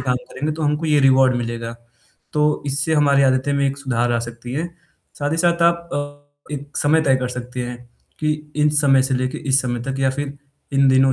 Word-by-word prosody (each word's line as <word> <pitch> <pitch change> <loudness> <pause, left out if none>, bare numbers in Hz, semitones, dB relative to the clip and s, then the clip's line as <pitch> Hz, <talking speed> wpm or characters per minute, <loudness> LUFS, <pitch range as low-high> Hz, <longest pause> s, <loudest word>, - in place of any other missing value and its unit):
काम 125 -1 0
करेंगे 150 +2 -2
तो 160 - -5
हमको 150 +2 0
ये 150 -1 +3
रिवॉर्ड 130 -1 +5
मिलेगा, 115 -1 -4 0.6
तो 150 0 +1
इससे 140 +3 0
हमारी 140 -2 +4
आदतें 130 +1 +2
में 140 0 +2
एक 135 +1 -2
सुधार 120 -3 0
आ 115 - +1
सकती 120 +1 -7
है, 160 +5 -1 0.5
साथ 145 0 -1
ही - - 0
साथ 170 0 +2
आप 170 0 +2
अ, 145 0 -5 0.3
एक 145 +1 -8
समय 155 +2 +3
तय 135 -3 +3
कर 125 -1 -2
सकते 125 0 -5
हैं 120 0 -6 0.4
कि 155 -1 +1 0.2
इस 150 0 +3
समय 135 -2 +4
से 130 0 0
लेके 130 0 -1
इस 135 +1 +4
समय 120 -1 -2
तक 135 +1 -4
या 135 -1 +2
फ़िर 145 +1 -5 0.4
इन 135 0 +4
दिनों 130 0 +5
140 Hz, 215 wpm, -20 LUFS, 130-150 Hz, 0.6 s, रिवॉर्ड